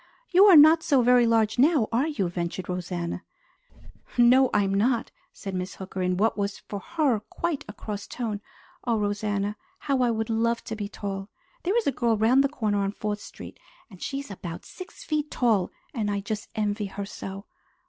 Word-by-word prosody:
"You 380 +3 +7
are 390 -4 +8
not 315 +2 +8
so 280 -7 +3
very 245 0 +5
large 225 0 +2
now, 280 -4 +4
are 250 +6 +2
you?" 280 - -1
ventured 175 +1 -4
Rosanna. 175 -1 -4 0.9
"No, 250 +2 +6
I 210 - +3
am 195 0 0
not," 230 +4 +1 0.2
said 195 -2 -7
Miss 185 +1 -4
Hooker 190 0 -6
in 180 0 0
what 220 +4 +2
was 200 -1 -2
for 205 - -7
her 300 -5 0
quite 315 +8 -3
a 205 - -7
cross 205 -2 -6
tone. 220 -4 -4 0.4
"Oh, 235 -2 +1
Rosanna, 205 0 -1 0.2
how 275 -6 0
I 245 - +3
would 220 0 -1
love 230 +1 +1
to 220 - -5
be 205 -2 -5
tall! 195 -1 -5 0.3
There 385 +6 +1
is 470 - +1
a - - +3
girl 235 -3 +1
round 240 +6 +4
the 275 - +1
corner 215 -8 -1
on 200 0 -1
Fourth 210 0 -3
Street, - - -11 0.3
and 185 - -14
she 275 - -3
is 280 -6 -8
about 175 -3 -7
six 365 - -11
feet 305 -1 -1
tall, 220 -7 +2 0.2
and 215 -4 -1
I 200 0 0
just 205 +1 -5
envy 210 -1 -1
her 200 +1 -5
so! 195 0 -8
215 Hz, 200 wpm, -26 LUFS, 200-255 Hz, 0.9 s, are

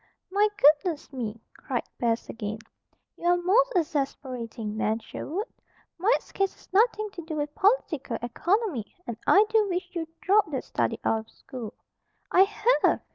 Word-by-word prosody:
"My 410 +2 +4
goodness 300 0 +3
me!" 230 -4 -4 0.2
cried 245 -3 -3 0.2
Bess 230 -1 0
again. 215 -1 -4 0.6
"You - - -9
are 350 0 +5
most 425 +9 +3
exasperating, 260 -9 -2
Nan 220 0 +1
Sherwood. 345 - -5 0.5
Mike's 425 +8 +1
case 390 -1 0
has - - -22
nothing 430 0 +3
to 360 - -7
do 320 -1 -6
with 295 -1 -2
political 325 - +1
Economy, 340 - -1
and 235 - -4
I 410 +2 +7
do 435 -2 +3
wish 355 0 -2
you'd 325 -2 -3
drop 415 +3 +4
that - - -3
study - - -1
out 225 - +2
of - - -26
school 240 -5 -9 0.3
" - - -45
"I 370 - +6
have!" 425 +4 +2
325 Hz, 160 wpm, -27 LUFS, 240-400 Hz, 0.6 s, I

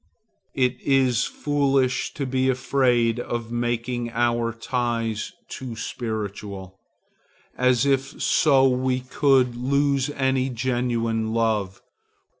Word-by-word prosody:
It 125 -1 +1
is 130 -3 +2
foolish 140 -3 0
to 140 - -2
be 130 0 +1
afraid 125 -3 +2
of 120 -1 -4
making 120 0 -2
our 120 0 0
ties 115 -2 -2 0.2
too 125 -3 -7
spiritual, 100 -4 -5 0.8
as 125 0 +2
if 135 0 0
so 135 -4 +4
we 130 0 0
could 130 -1 +2
lose 140 +2 +1
any 130 -2 0
genuine 115 -3 -1
love. 105 -5 -1
125 Hz, 100 wpm, -24 LUFS, 115-130 Hz, 0.8 s, so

